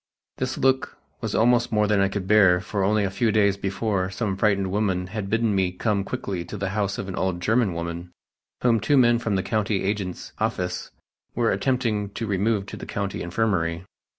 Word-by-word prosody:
This 130 0 -2
look 130 0 +1 0.2
was - - -3
almost 120 +1 +3
more 105 -1 +3
than 105 -1 +2
I 100 - +4
could 100 -1 -3
bear 95 -4 +5
for 95 +2 -2
only 105 +2 +2
a 95 - -1
few 115 +2 +1
days 100 -2 +3
before 95 -1 -1
some 100 0 -2
frightened 100 -2 +1
women 95 -3 0
had 100 +1 -5
bidden 115 0 +1
me 95 -2 +1
come 100 +2 0
quickly 95 -2 -4
to 95 +4 -7
the 100 -1 -2
house 100 0 -1
of 95 - -4
an 95 - -5
old 95 -2 -1
German 110 -1 +1
woman, 85 +1 -5 0.5
whom 115 -2 +4
two 140 +7 +2
men 120 -2 +5
from 115 -4 -1
the 95 - 0
country 105 -3 0
agent's 95 -2 -3
office 90 0 -2 0.5
were 120 -1 +2
attempting 115 -6 0
to 115 - -3
remove 100 0 0
to - - -8
the - - -8
County 100 -1 -3
Infirmary. 85 -2 -1
100 Hz, 200 wpm, -24 LUFS, 95-110 Hz, 0.5 s, bear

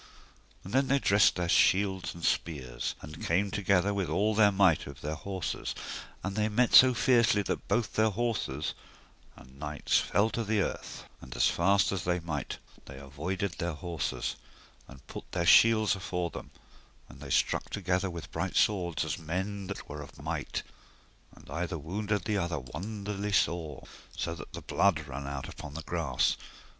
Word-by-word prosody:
And 95 - -9
then 135 +1 +3
they 140 - +3
dressed 100 -6 +4
their 90 -1 -1
shields 95 +1 +3
and 85 - -10
spears, 65 -7 -1
and 75 +1 -9
came 95 +4 +1
together 100 0 +2
with 100 -3 -1
all 105 +3 +2
their 105 -1 +5
might 95 -5 +3
of 70 +1 -10
their 75 +1 -3
horses; 95 +2 -4 0.5
and 95 +1 -3
they 110 0 +1
met 120 +3 +2
so 130 -1 +9
fiercely 115 -6 +4
that - - -3
both 120 -2 0
their 110 0 +3
horses 100 - -2 0.6
and 65 +1 -16
knights 75 0 +1
fell 110 +2 +1
to 115 - -1
the 110 0 +1
earth, - - -3 0.2
and 65 -1 -9
as - - +4
fast 100 +4 +3
as 95 -4 -2
they 90 0 +1
might 75 -6 -4 0.3
avoided 75 +9 -4
their 85 0 -1
horses, 85 -1 -3 0.5
and - - -14
put - - -9
their 85 -1 0
shields 110 +1 +6
afore 90 -2 -3
them; - - -8 0.6
and - - -14
they 70 -1 -9
struck - - +1
together 95 0 -1
with 85 -2 -7
bright 90 +3 -3
swords, 90 -6 +2
as - - -3
men 95 +4 -3
that - - -6
were 75 +1 -6
of 70 -2 -12
might, - - -3 0.7
and - - -17
either 85 0 -2
wounded 105 +7 -2
other 85 -3 -1
wonderly 100 - -5
sore, 85 -7 0 0.4
that 85 0 -6
the - - -7
blood 95 -6 +2
ran 70 +1 -6
out 70 -1 -4
upon 70 0 -9
the 80 - -5
grass. 75 -8 0
90 Hz, 170 wpm, -30 LUFS, 80-100 Hz, 0.7 s, so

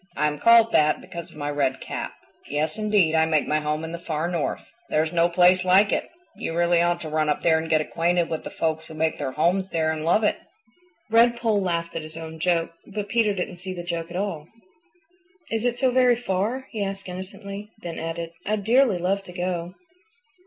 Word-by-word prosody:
"I 150 - +2
am 150 -1 -1
called 230 -1 +6
that 150 0 +3
because 170 -1 -8
of - - -16
my 145 -1 -3
red 135 -2 0
cap. - - -5 0.4
Yes, 150 +4 -1
indeed, 210 -7 +3
I 160 0 +3
make 155 -2 +1
my 155 - +2
home 150 +1 -2
in 160 - -5
the 170 - -5
Far 160 -1 -2
North. 170 -4 -2 0.3
There 155 - +2
is 160 - -4
no 170 0 +3
place 180 +1 +5
like 190 +3 +5
it. - - -1 0.3
You 165 - -4
really 170 0 +3
ought 175 0 +1
to 160 - -5
run 155 0 +1
up 150 - 0
there 160 -1 +4
and 160 0 -5
get 155 -1 +3
acquainted 170 +2 +1
with 160 - -4
the - - -6
folks 160 -1 -2
who 160 - -10
make 160 0 0
their 135 -3 -3
homes 185 +6 +1
there 160 -2 0
and 155 -1 -4
love 175 +7 +3
it." 210 - +2 0.7
Redpoll 230 -2 +4
laughed 170 -2 -2
at 165 - -2
his 155 +1 -10
own 160 0 -8
joke, 165 -1 +1 0.2
but 205 0 -5
Peter 220 -3 +2
didn't 180 -1 -4
see 185 +1 -6
the 175 - -6
joke 170 -1 -4
at 175 - -5
all. 180 -6 -3 1.0
"Is 225 +1 -1
it 240 0 +1
so 260 0 +2
very 250 -1 +4
far?" 230 +3 -2
he 215 -3 -2
asked 195 0 -5
innocently; 200 +3 -7
then 170 -1 -5
added, 165 +1 -4
"I'd 210 0 -1
dearly 235 -2 +4
love 190 +3 0
to 180 - -10
go." 180 0 -3
175 Hz, 220 wpm, -24 LUFS, 160-200 Hz, 1.0 s, called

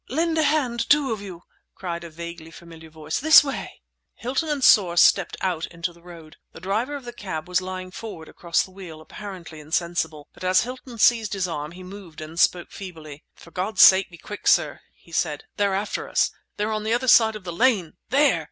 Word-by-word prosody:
"Lend 325 +4 0
a - - +4
hand, 270 -6 0
two 285 -3 +4
of 215 - -6
you!" 185 -4 -9 0.3
cried 170 -2 -5
a 170 - -8
vaguely 170 0 -9
familiar 165 -1 -13
voice—"this 160 - +5
way!" 275 -2 -6 0.3
Hilton 270 +7 -2
and 290 -3 -1
Soar 180 -8 +5
stepped - - +4
out 175 -4 -1
into 170 +1 -5
the 170 - -20
road. 170 -3 -13 0.2
The - - -11
driver 215 - -2
of 275 -3 -8
the 240 - -7
cab 180 -8 -6
was 180 0 +1
lying 185 0 -6
forward 190 -6 -8
across 170 -1 0
the 190 - -12
wheel, 180 -5 -10
apparently 175 -2 -10
insensible, 160 -1 -2
but - - -13
as 185 0 +4
Hilton 250 0 -8
seized 225 -2 +3
his 190 -2 -1
arm 150 -1 -5
he 185 +1 -11
moved 180 -4 -11
and 155 +2 -7
spoke 175 0 +2
feebly. 160 -6 -10
"For 170 - -16
God's 195 +5 +2
sake 190 0 +7
be 170 - -13
quick, 205 +5 -8
sir!" - - +3 0.2
he - - -22
said. - - -1
"They're 200 -2 +1
after 200 +2 -3
us! - - +2 0.3
They're 210 +1 -1
on 215 -1 -2
the 220 +1 0
other 250 +2 0
side 220 -3 +6
of 210 - -8
the 175 -2 -6
lane, 200 -6 +2 0.2
there!" 275 - +3
185 Hz, 205 wpm, -24 LUFS, 170-225 Hz, 0.3 s, sake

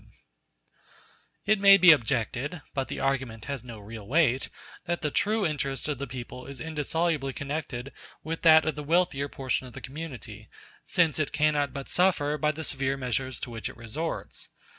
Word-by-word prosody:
] - - -31
It 215 0 +3
may 195 0 +9
be 180 -3 +9
objected 135 +3 0
(but 135 -1 -1
the - - -5
argument 130 -5 -1
has 140 -4 -4
no 120 -3 -9
real 105 0 -9
weight) 135 -3 +2 0.4
that 175 0 -2
the 150 - 0
true 215 +4 +1
interest 140 -4 -2
of 145 -4 -2
the 140 - -4
people 125 0 -8
is 140 -1 -7
indissolubly 155 -2 -1
connected 140 -3 -4 0.3
with 165 +1 -4
that 160 -1 +7
of 160 - +1
the 150 +1 -6
wealthier 150 -3 +1
portion 130 -1 -2
of 125 - -12
the - - -7
community, 130 -8 -8 0.3
since 165 -3 +2
it 155 - 0
cannot 150 -2 +2
but 135 0 -6
suffer 170 -5 +2
by 150 - +2
the 155 +1 -3
severe 135 -2 -1
measures 130 0 -2
to 120 - -5
which 115 -1 -4
it - - -12
resorts. 140 +8 -5
140 Hz, 180 wpm, -28 LUFS, 130-160 Hz, 0.4 s, may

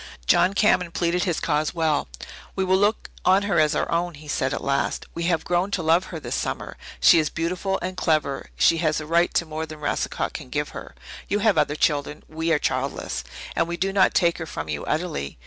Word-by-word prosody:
John 185 - +4
Cameron 185 -4 +3
pleaded 175 +2 0
his 175 -4 0
cause 150 +2 0
well. 160 - +1 0.5
"We 190 - 0
will 185 0 +3
look 205 +2 +1
on 190 +2 +4
her 200 -5 +1
as 155 0 +3
our - - -1
own," 170 0 0
he 150 +1 -13
said 130 -2 -1
at - - -3
last. 140 0 -1
"We 170 - -3
have 170 -2 +1
grown 175 +2 +1
to 190 -4 -2
love 165 +4 +3
her 165 - -7
this - - -5
summer. - - -3 0.2
She 65 - +7
is 155 -2 +1
beautiful 180 +4 -2
and 185 0 -3
clever 155 -6 0
she 165 - +4
has 155 -2 +1
a 155 - -6
right 170 +2 +2
to 170 - +2
more 160 0 -5
than 155 0 -9
Racicot 150 - -2
can - - -8
give - - -2
her. - - -9 0.3
You 205 - +1
have 215 -4 +5
other 150 -1 +2
children 150 -1 0
we 160 +1 -2
are 160 - +4
childless. - - -2 0.3
And 165 - +1
we 170 0 -3
do 195 +3 -1
not 195 -1 +3
take 170 -2 +3
her 160 - -5
from 80 - -6
you 75 -1 -3
utterly. 155 - -3
165 Hz, 225 wpm, -24 LUFS, 155-180 Hz, 0.5 s, She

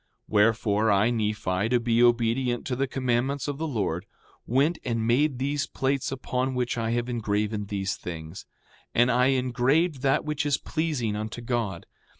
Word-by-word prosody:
5:31 - - -52
Wherefore, 110 0 +3
I, 100 +3 +4
Nephi, 105 -3 -1
to 125 0 +3
be 115 0 +2
obedient 120 +1 +2
to 130 - -2
the 135 +2 0
commandments 130 +2 -1
of 145 0 -3
the 160 - -1
Lord, 100 - -2 0.4
went 140 +7 +2
and 115 -3 -1
made 130 +4 +2
these 145 +3 -1
plates 135 0 -1
upon 130 0 -2
which 125 -1 -1
I 115 -1 -1
have 120 +1 0
engraven 105 -3 -1
these 95 -1 -2
things. 80 0 -8 0.5
5:32 - - +5
And 120 +1 +4
I 125 +1 +3
engraved 130 +4 +1
that 135 +1 +2
which 150 0 -1
is 145 -2 +1
pleasing 150 -10 -2
unto 110 +3 -5
God. 115 -7 -2
120 Hz, 170 wpm, -26 LUFS, 110-135 Hz, 0.5 s, 5:32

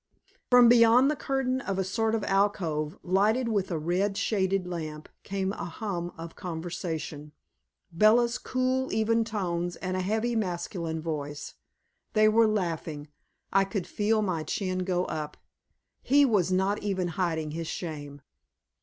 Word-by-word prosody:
From 245 -1 +8
beyond 240 +3 +6
the - - -1
curtain 265 -2 -1
of 195 -7 -3
a 190 - +1
sort 220 +4 0
of 220 - -2
alcove, 190 -5 0
lighted 215 +7 +2
with 200 -4 0
a 170 - -1
red 185 +6 0
shaded 195 -3 0
lamp, 155 -4 -6
came 195 0 -2
a - - -5
hum 175 -1 -4
of 165 0 -8
conversation, 160 -3 -5 0.6
Bella's 225 +7 +4
cool, 255 +1 -1
even 225 +1 +2
tones, 175 -6 -2
and 185 0 -4
a 185 - 0
heavy 220 +5 0
masculine 170 -5 -3
voice. 145 -2 -4 0.6
They 215 -1 +5
were 225 +1 +5
laughing; 165 -7 -2 0.4
I 195 0 +5
could 195 -1 -3
feel 215 +1 +1
my 180 -5 -1
chin 185 +3 -2
go 180 -1 0
up. 150 -1 -5 0.6
He 285 +2 +5
was 195 -8 +2
not 190 +2 +1
even 190 -3 -1
hiding 160 -3 -1
his 165 +1 -4
shame. 145 -5 -6
190 Hz, 145 wpm, -28 LUFS, 165-220 Hz, 0.6 s, From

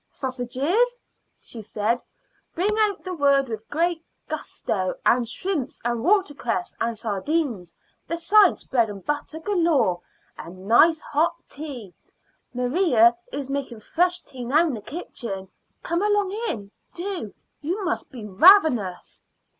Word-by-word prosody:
"Sausages," 275 - -1 0.4
she 230 - -9
said, 215 +3 -1 0.5
bringing 420 +5 +1
out 420 -2 +1
the 370 - -4
word 280 -4 +3
with 220 -1 -7
great 335 +1 0 0.2
gusto, 185 -3 -3
"and 240 -1 +3
shrimps, 310 +1 -3
and 240 -1 -1
water 380 -2 +3
cress, 230 -9 -3
and 230 -1 -1
sardines, 220 - -2 0.3
besides 375 +4 +4
bread 235 -4 +1
and 200 -3 -9
butter 295 +1 -3
galore, 320 - +1 0.4
and 185 +3 -10
nice 315 +8 +5
hot 320 +4 +1
tea. 265 - -8 0.6
Maria 250 - +3 0.2
is 275 -1 -5
making 270 -5 -4
fresh 355 +8 +1
tea 255 -3 -9
now 295 +8 +3
in 310 - -1
the 220 - -5
kitchen. 210 - -6 0.4
Come 340 +2 -1
along 415 -2 +2 0.2
in 200 - -4 0.2
do; 355 - -4 0.3
you 365 +7 -2
must 355 - -2
be 240 -6 -9
ravenous." 235 - +4
275 Hz, 130 wpm, -24 LUFS, 230-345 Hz, 0.6 s, nice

